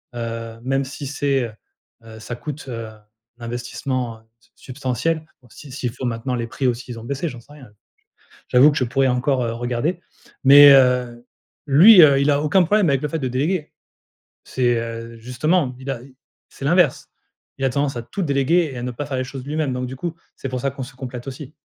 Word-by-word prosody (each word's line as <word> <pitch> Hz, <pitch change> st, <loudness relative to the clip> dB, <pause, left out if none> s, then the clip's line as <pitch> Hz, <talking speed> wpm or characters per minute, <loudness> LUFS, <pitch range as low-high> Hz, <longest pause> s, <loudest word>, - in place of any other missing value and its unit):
heu, 115 Hz, -1 st, -5 dB
même 135 Hz, +2 st, 0 dB
si 140 Hz, +1 st, -7 dB
c'est, 135 Hz, -5 st, -1 dB, 0.5 s
heu, 110 Hz, -1 st, -12 dB
ça 120 Hz, +2 st, -6 dB
coûte, 150 Hz, +3 st, -7 dB
heu, 115 Hz, -2 st, -5 dB, 0.5 s
un 120 Hz, -, -8 dB
investissement 120 Hz, -1 st, -4 dB, 0.2 s
su -, -, -31 dB, 0.2 s
substantiel. 150 Hz, +4 st, -2 dB, 0.2 s
Bon, 125 Hz, -, -21 dB
si 145 Hz, -3 st, -12 dB
s'il 125 Hz, -3 st, -3 dB
faut 130 Hz, +2 st, -7 dB
maintenant 120 Hz, +1 st, -2 dB
les 115 Hz, -1 st, -3 dB
prix 125 Hz, +4 st, -2 dB
aussi 125 Hz, +1 st, -3 dB
ils 115 Hz, -, -7 dB
ont -, -, -11 dB
baissé, 140 Hz, +7 st, -3 dB
j'en 125 Hz, -4 st, -10 dB
sais 145 Hz, -, -18 dB
rien. 140 Hz, -5 st, -14 dB, 0.8 s
J'avoue 135 Hz, +5 st, +6 dB
que 145 Hz, -, -3 dB
je 125 Hz, -, +1 dB
pourrais 135 Hz, +3 st, +1 dB
encore, 130 Hz, +1 st, +1 dB
heu, 115 Hz, -, -2 dB
regarder, 120 Hz, +9 st, -2 dB, 0.4 s
mais 140 Hz, +1 st, +9 dB
heu, 125 Hz, -2 st, +3 dB, 0.4 s
lui, 180 Hz, +8 st, +8 dB
heu, 140 Hz, -2 st, +6 dB
il 145 Hz, -, +3 dB
a 140 Hz, 0 st, +1 dB
aucun 155 Hz, +5 st, +3 dB
problème 200 Hz, 0 st, +2 dB
avec 135 Hz, -2 st, +1 dB
le 150 Hz, -, -1 dB
fait 160 Hz, -, -3 dB
de 130 Hz, -, -2 dB
déléguer. 150 Hz, +6 st, -1 dB, 0.7 s
C'est, 120 Hz, -2 st, +1 dB
heu, 115 Hz, 0 st, -7 dB
justement, 130 Hz, +4 st, 0 dB
il 135 Hz, +1 st, -8 dB
a 130 Hz, -, -4 dB, 0.5 s
c'est 135 Hz, -, -9 dB
l'inverse. 170 Hz, -2 st, +2 dB, 0.5 s
Il -, -, -3 dB
a -, -, +2 dB
tendance 140 Hz, +1 st, -1 dB
à -, -, -3 dB
tout 150 Hz, -, -4 dB
déléguer 145 Hz, +2 st, +1 dB
et -, -, -7 dB
à 120 Hz, -, -5 dB
ne 125 Hz, -, -3 dB
pas 135 Hz, +5 st, -5 dB
faire 140 Hz, -1 st, -4 dB
les 130 Hz, -, -1 dB
choses 130 Hz, 0 st, -8 dB
lui-même 150 Hz, -1 st, -2 dB
donc 125 Hz, 0 st, -3 dB
du 130 Hz, -, -7 dB
coup 165 Hz, +5 st, -5 dB, 0.2 s
c'est 135 Hz, -, -6 dB
pour 130 Hz, -1 st, -3 dB
ça 140 Hz, -, -1 dB
qu'on 135 Hz, -1 st, -6 dB
se 130 Hz, +1 st, -11 dB
complète 125 Hz, -1 st, -8 dB
aussi. 135 Hz, +2 st, -8 dB
130 Hz, 215 wpm, -21 LUFS, 120-145 Hz, 0.8 s, mais